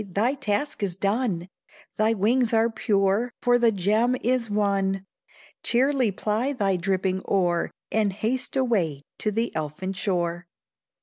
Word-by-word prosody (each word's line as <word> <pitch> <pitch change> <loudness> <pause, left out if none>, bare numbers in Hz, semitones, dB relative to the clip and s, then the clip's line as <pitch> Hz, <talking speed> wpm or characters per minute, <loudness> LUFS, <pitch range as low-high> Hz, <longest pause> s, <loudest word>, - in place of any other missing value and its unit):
thy 230 +7 +2
task 265 +1 -2
is 190 -4 -1
done, 195 -3 -1 0.5
Thy 215 +1 +3
wings 230 +4 +2
are 225 +1 +3
pure, 210 +1 +1
for 245 -1 +3
the 235 -1 +4
gem 215 +6 +2
is 245 -1 +1
won 195 -2 0 0.6
Cheerly 255 0 +2
ply 215 +7 -1
thy 200 -7 +1
dripping 190 +1 0
oar, 175 -3 +1 0.2
And 215 -2 +2
haste 225 +8 -2
away 195 - +1 0.2
to 215 - +1
the 225 +3 -1
elfin 160 +5 -3
shore. 175 -2 -2
210 Hz, 135 wpm, -25 LUFS, 190-235 Hz, 0.6 s, the